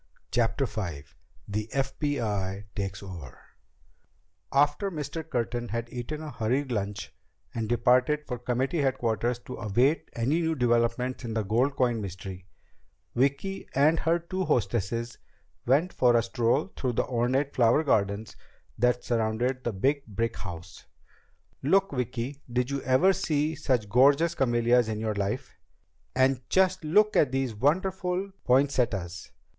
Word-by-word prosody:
CHAPTER 120 +3 +1
V 90 - -5 0.4
The 105 +2 -3
FBI 110 -9 -1
Takes 100 -2 -4
Over 85 -10 -9 1.1
After 145 +8 +2
Mr. 160 -1 -5
Curtin 120 -1 -2
had 115 +2 -4
eaten 150 +6 -5
a 155 - -6
hurried 125 +3 -1
lunch 100 -3 -3 0.4
and 115 -2 -3
departed 125 +5 +3
for 125 -3 -5
committee 130 +6 -1
headquarters 120 -3 0
to 125 - -7
await 125 +9 +1
any 135 +9 +1
new 160 -1 0
developments 120 0 +1
in 115 -2 -4
the 110 - 0
gold 120 +8 +1
coin 120 -5 +1
mystery, 95 -1 -7 0.7
Vicki 140 +10 0
and 155 +4 +4
her 165 +1 +2
two 185 +3 -3
hostesses 115 - -1 0.5
went 150 +8 +3
for 120 -2 +4
a 115 - +2
stroll 120 +8 0
through 125 -2 -1
the - - 0
ornate 130 +3 0
flower 120 +5 +4
gardens 105 -5 0 0.4
that 125 +1 +2
surrounded 120 +3 0
the 120 - -1
big 135 +8 0
brick 115 +2 -2
house. 90 -1 -9 0.7
"Look, 195 +7 +3
Vicki. 125 +1 -3
Did 125 +2 0
you 140 -1 -2
ever 145 +10 +4
see 155 -2 0
such 130 -8 0
gorgeous 140 +9 +4
camellias 120 -4 +2
in 110 -1 -2
your 110 -1 -1
life? 105 +6 -3 0.6
And 130 0 +3
just 185 -1 +2
look 205 +7 +3
at 140 - +4
these 135 -3 -1
wonderful 180 - 0
poinsettias. 120 -10 +1
125 Hz, 140 wpm, -28 LUFS, 115-145 Hz, 1.1 s, and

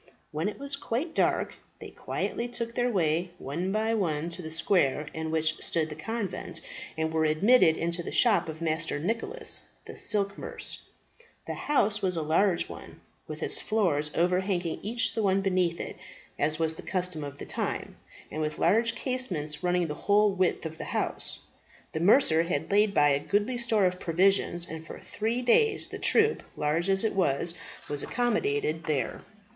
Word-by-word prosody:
When 155 +6 -1
it 210 - -8
was 280 0 -3
quite 280 +6 -3
dark - - +1 0.2
they - - -10
quietly 235 - -3
took 235 -1 -4
their 245 +1 +1
way, 175 -4 +1
one 170 +7 -3
by 220 +2 +1
one, 165 -6 -1
to 170 +1 -3
the 160 - -6
square 160 -3 +1
in 160 0 -4
which 160 0 +1
stood 160 -2 0
the 150 - -6
convent, 215 +4 -4 0.4
and 160 0 -1
were 160 0 +2
admitted 160 +3 +4
into 170 +1 -1
the - - -6
shop 200 -9 +4
of 160 +1 -6
Master 160 -1 -1
Nicholas, 230 - 0 0.2
the - - -9
silk 200 -1 +2
mercer. - - -4 0.7
The - - -4
house 215 -8 +1
was 185 -2 +1
a 160 - -1
large 170 +4 +2
one, - - -11 0.3
with - - -6
its - - -2
floors 175 -9 +1
overhanging 180 0 0
each 230 +4 0
the 225 - -1
one 195 -1 +2
beneath 180 -3 +1
it, - - -6 0.4
as 155 +1 +2
was 160 0 +1
the - - -7
custom 180 -5 -2
of 145 0 -7
the - - -7
time, - - -3 0.4
and 155 - -3
with 155 0 -2
large 230 +2 +3
casements 175 - -2
running 180 -1 +1
the 150 - -3
whole 205 +5 +3
width 185 -2 0
of 160 0 -6
the - - -4
house. - - -2 0.5
The 160 - -3
mercer 175 - +5
had 170 -2 -2
laid 205 0 +3
by 145 0 +5
a 140 -1 +2
goodly 210 - 0
store 225 -4 +3
of 180 0 0
provisions, 175 0 +2
and 160 0 -7
for 160 - -9
three 230 +4 -2
days 430 - +3
the - - -7
troop, 445 0 +3
large 160 +5 0
as 195 +1 +2
it 220 - +1
was, 170 -2 +1 0.3
was 145 -1 -1
accommodated 165 - 0
there. 140 -7 -1
180 Hz, 180 wpm, -28 LUFS, 160-215 Hz, 0.7 s, mercer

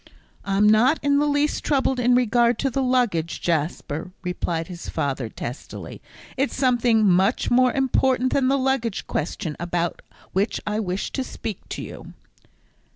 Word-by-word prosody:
"I'm 200 +1 +2
not 240 +8 +4
in 285 0 +3
the 295 - +2
least 290 +1 +1
troubled 265 -3 +1
in 245 0 +4
regard 240 -1 +3
to 270 - -1
the 270 - 0
luggage, 240 -11 +1
Jasper," 160 0 -2
replied 175 -2 -2
his 175 -2 -8
father, 135 -5 -2
testily; 120 +4 -7 0.4
"it's 275 +2 0
something 240 -4 +3
much 190 +5 +2
more 255 +1 +5
important 260 -1 +1
than 270 -2 +2
the 275 +1 +3
luggage 260 -5 -1
question 155 0 -3
about 175 0 -2 0.3
which 195 +4 0
I 210 0 -1
wish 185 -2 -3
to 265 - -2
speak 220 -5 -6
to - - -5
you." - - -10
230 Hz, 155 wpm, -23 LUFS, 180-260 Hz, 0.4 s, more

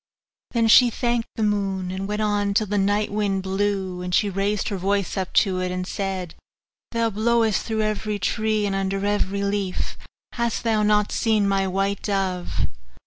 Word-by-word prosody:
Then 230 -2 +2
she 245 +2 +7
thanked 235 0 -1
the 220 - -1
moon, 195 -3 0
and 190 +1 -4
went 210 +1 -1
on 205 -1 0
till 215 - +3
the 205 0 0
night 205 +2 +1
wind 200 -2 0
blew; 190 -1 -1
and 180 0 -1
she 205 -2 +2
raised 200 +1 0
up - - -1
her 200 - -1
voice 195 0 0 0.2
to 190 -3 +3
it, 185 0 -1
and 180 0 -3
said, 190 -3 -3 0.6
'Thou 230 -1 0
blowest 220 0 +2
through 220 -1 -1
every 215 0 -1
tree 215 +2 0
and 200 - -1
under 195 0 -1
every 200 -1 0
leaf 200 -2 -2 0.3
hast 235 -2 -1
thou 220 -2 +2
not 210 -1 +2
seen 215 -3 +2
my 195 -1 +1
white 195 +1 -1
dove? 190 -3 -1
200 Hz, 180 wpm, -23 LUFS, 195-215 Hz, 0.6 s, she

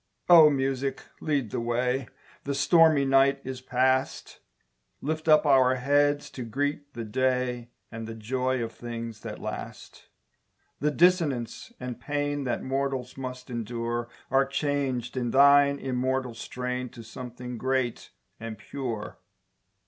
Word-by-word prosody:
O 165 -3 +9
Music, 135 -1 -1 0.2
lead 140 -8 -1
the - - -2
way 125 +2 0 0.4
The 140 0 -1
stormy 155 0 +5
night 135 +1 +4
is 130 -1 -6
past, 130 +1 0 0.6
Lift 155 +2 -3
up 155 0 +6
our 130 -2 +5
heads 145 +3 +2
to 130 - -6
greet 145 +4 -3
the 115 - -4
day, 125 +1 -1 0.2
And 115 0 -6
the 115 - -6
joy 125 +3 -1
of 115 - -4
things 115 -2 -7
that - - -7
last. - - -8 0.7
The 150 - +2
dissonance 155 - +1
and 125 -1 -6
pain 145 -1 -2
That 125 - -2
mortals 135 -1 -2
must 130 -1 -7
endure 120 0 -3 0.2
Are 135 0 +4
changed 135 -4 -1
in 125 -2 -1
thine 140 +2 +6
immortal 130 -1 -1
strain 125 +2 -4
To 115 - -11
something 125 +1 -8
great 130 -2 -1 0.3
and 115 -1 -6
pure. 115 -1 -5
130 Hz, 135 wpm, -27 LUFS, 120-140 Hz, 0.7 s, O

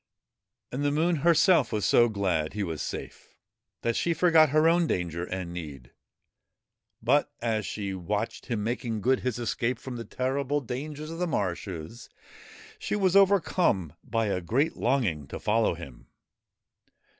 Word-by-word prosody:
And 135 +3 -3
the 145 - +2
Moon 165 +4 +1
herself 165 +3 +4
was 105 -2 -1
so 120 0 +5
glad 95 -7 -1
he 105 0 -2
was 80 -5 -4
safe, - - -7 0.5
that 115 0 0
she 170 -1 +1
forgot 165 -2 +5
her 155 +3 +4
own 170 0 +3
danger 85 - -2
and 90 -2 -5
need. 70 -8 -8 1.1
But, 145 +3 +3
as 110 -3 -1
she 100 -2 -4
watched 105 +4 -3
him 110 -4 -2
making 115 -1 -2
good 130 +4 +2
his 125 -2 -2
escape 120 +1 -1
from 125 +1 -7
the 115 - -5
terrible 135 +4 -1
dangers 145 +5 -6
of 165 - -7
the 180 - 0
marshes, 95 - -4 0.7
she - - -2
was 190 -3 +2
overcome 180 - +3
by 115 -2 -1
a 100 -3 -1
great 125 - 0
longing 105 - 0
to - - -7
follow 110 -3 +1
him. 70 -8 -11
120 Hz, 155 wpm, -27 LUFS, 95-150 Hz, 1.1 s, so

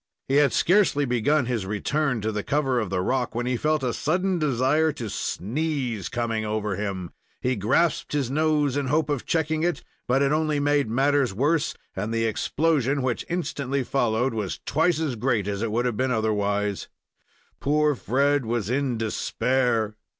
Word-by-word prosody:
He 135 - +2
had 145 -3 +4
scarcely 175 -6 +3
begun 125 +3 +2
his 115 -6 -2
return 125 +5 -1
to 110 +2 -1
the 105 -1 -2
cover 135 0 0
of 110 -5 -2
the 90 -1 0
rock, 125 +2 -1
when 120 +1 -1
he 125 0 0
felt 155 +3 0
a 125 -2 0
sudden 180 +4 0
desire 150 +2 +2
to 115 -6 -6
sneeze 130 - -2
coming 115 -3 -2
over 105 -2 -2
him. 95 -3 -4 0.3
He 125 +1 0
grasped 115 - +1
his 140 -4 0
nose, 150 -2 +1
in 145 -1 0
the 130 - -2
hope 155 0 +1
of 140 -4 -3
checking 160 -1 0
it 175 +1 -1 0.2
but 135 +3 +3
it 140 - +2
only 155 -1 +1
made 145 -3 +2
matters 135 -2 +2
worse, 145 +6 +1 0.2
and 105 +4 -3
the 115 0 0
explosion 140 +3 +1
which 125 -2 -2
instantly 140 -6 -2
followed 120 -1 0
was 105 -4 -3
twice 160 +2 +2
as 150 -6 -1
great 115 -3 0
as 100 0 -2
it 115 -2 -1
would 120 +3 0
have 120 -4 -1
been 130 +1 +1
otherwise. 105 -3 0 0.7
Poor 150 +2 +2
Fred 140 +3 +1
was 115 -2 -2
in 130 -2 0
despair! 115 0 0
130 Hz, 180 wpm, -25 LUFS, 110-145 Hz, 0.7 s, had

